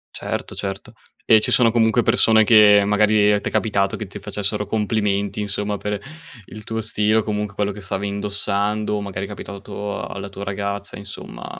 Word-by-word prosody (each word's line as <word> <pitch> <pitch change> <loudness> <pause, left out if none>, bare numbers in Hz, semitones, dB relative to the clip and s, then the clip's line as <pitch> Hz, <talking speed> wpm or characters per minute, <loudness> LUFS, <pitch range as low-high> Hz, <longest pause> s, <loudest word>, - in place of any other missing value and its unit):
Certo, - - -5
certo. 95 0 -6 0.3
E 110 - +6
ci 105 - -1
sono 115 -2 +5
comunque 115 +1 +3
persone 110 -1 +4
che 105 -2 +7
magari 105 0 +3
t'è - - -4
capitato 100 -3 0
che 105 - -6
ti 95 - -9
facessero 105 +1 -2
complimenti, 105 -1 -1
insomma, 105 0 -1
per 105 0 -3 0.5
il 110 +3 -11
tuo 110 +1 -3
stile 105 0 +1
o 110 - +2
comunque 105 -1 -3
quello 105 0 -1
che 105 +1 -9
stavi 95 +1 -3
indossando, 100 +1 -1
o 105 - -2
magari 100 -1 -4
è - - -8
capitato 100 0 -6
alla 100 0 -6
tua 100 0 -8
ragazza, 100 0 -4
insomma, 100 0 -9
105 Hz, 175 wpm, -21 LUFS, 100-105 Hz, 0.5 s, che